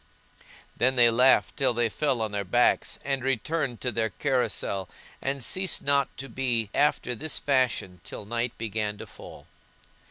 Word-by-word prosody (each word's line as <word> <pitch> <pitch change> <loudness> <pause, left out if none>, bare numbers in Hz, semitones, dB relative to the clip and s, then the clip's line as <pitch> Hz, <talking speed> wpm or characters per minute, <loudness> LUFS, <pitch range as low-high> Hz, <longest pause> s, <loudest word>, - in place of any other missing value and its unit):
Then 130 +2 +2 0.2
laughed 130 +2 +4
they - - -10
till 125 - +3
they 120 0 +2
fell 130 0 0
on 110 - -3
their 100 -1 -1
backs, 120 +6 +2
and 135 -2 -1
returned 135 0 -1
to 125 - -1
their 110 0 0
carousel, 100 -3 -1 0.3
and 135 -1 -2
ceased 185 +6 +1
not 140 -1 +1
to 135 - -6
be 120 -6 -1
after 145 -4 +1
this 155 +7 -2
fashion 125 - 0
till - - -8
night 115 +2 -2
began 105 -2 -3
to - - -8
fall. - - -12
125 Hz, 160 wpm, -27 LUFS, 110-135 Hz, 0.3 s, laughed